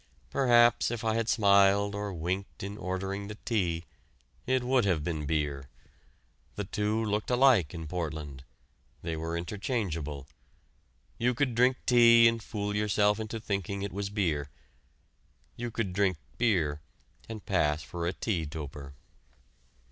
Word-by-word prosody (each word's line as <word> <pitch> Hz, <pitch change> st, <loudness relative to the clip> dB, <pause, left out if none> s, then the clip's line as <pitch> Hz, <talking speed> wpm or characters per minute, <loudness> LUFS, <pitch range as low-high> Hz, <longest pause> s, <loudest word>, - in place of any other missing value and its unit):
Perhaps 120 Hz, -2 st, +4 dB
if 120 Hz, 0 st, -4 dB
I 110 Hz, -1 st, +1 dB
had 115 Hz, 0 st, -1 dB
smiled 100 Hz, -1 st, +4 dB
or 100 Hz, 0 st, -3 dB
winked 90 Hz, +3 st, -4 dB
in 100 Hz, +1 st, -5 dB
ordering 95 Hz, +1 st, -4 dB
the 105 Hz, +1 st, -8 dB
tea, 90 Hz, -8 st, 0 dB, 0.6 s
it 130 Hz, 0 st, +2 dB
would 125 Hz, 0 st, +2 dB
have 90 Hz, -7 st, +1 dB
been 75 Hz, -3 st, -3 dB
beer. 70 Hz, -3 st, -2 dB, 0.9 s
The 105 Hz, -, -3 dB
two 105 Hz, +3 st, -1 dB
looked 105 Hz, 0 st, -1 dB
alike 125 Hz, -, +4 dB
in 80 Hz, -1 st, -6 dB
Portland; 75 Hz, -5 st, -5 dB, 0.6 s
they 80 Hz, -1 st, -3 dB
were 80 Hz, +1 st, -3 dB
interchangeable. 85 Hz, -, -3 dB, 0.9 s
You 125 Hz, +1 st, +1 dB
could 130 Hz, -1 st, 0 dB
drink 125 Hz, +3 st, +3 dB
tea 115 Hz, -2 st, +7 dB
and 115 Hz, 0 st, +1 dB
fool 105 Hz, -1 st, -4 dB
yourself 105 Hz, 0 st, +2 dB
into 110 Hz, +1 st, -4 dB
thinking 100 Hz, -2 st, -3 dB
it 100 Hz, -, -4 dB
was 100 Hz, +1 st, -3 dB
beer. 85 Hz, -9 st, -1 dB, 1.1 s
You 120 Hz, 0 st, -4 dB
could 110 Hz, -5 st, -3 dB
drink 95 Hz, -2 st, +1 dB, 0.2 s
beer 85 Hz, -11 st, +1 dB, 0.5 s
and 110 Hz, -2 st, -7 dB
pass 75 Hz, -6 st, +1 dB
for 85 Hz, -1 st, -4 dB
a 90 Hz, -, -1 dB
tea 90 Hz, -9 st, -2 dB
toper. 75 Hz, -2 st, -8 dB
100 Hz, 140 wpm, -29 LUFS, 85-115 Hz, 1.1 s, tea